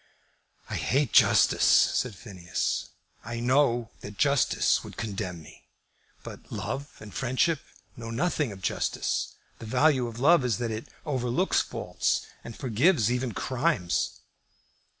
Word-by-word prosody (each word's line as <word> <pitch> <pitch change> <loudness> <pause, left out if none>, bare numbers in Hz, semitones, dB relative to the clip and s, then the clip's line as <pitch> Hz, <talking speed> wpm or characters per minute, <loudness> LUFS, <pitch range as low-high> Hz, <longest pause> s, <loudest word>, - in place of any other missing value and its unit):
"I - - -4
hate 140 -2 0
justice," - - +5
said 125 -5 +4
Phineas. 90 -3 -3 0.3
"I 120 +1 -5
know 120 -2 +2
that 100 0 -10
justice 140 -2 +2
would - - -11
condemn 95 -6 -4
me. - - -17 0.6
But - - -11
love 140 +2 -5
and 105 -1 -11
friendship 135 +5 +1 0.4
know 115 -1 -8
nothing 145 +1 -1
of 95 -2 -11
justice. - - -1 0.2
The 115 - -8
value 130 +1 +3
of 115 -1 -8
love 155 +2 +5
is 120 -5 0
that 120 -2 -2
it 110 +1 -5 0.2
overlooks 130 +4 +1
faults, - - -2 0.2
and 115 - -9
forgives 125 - +2
even 125 -2 -1
crimes." 130 - -1
120 Hz, 130 wpm, -27 LUFS, 110-140 Hz, 0.6 s, justice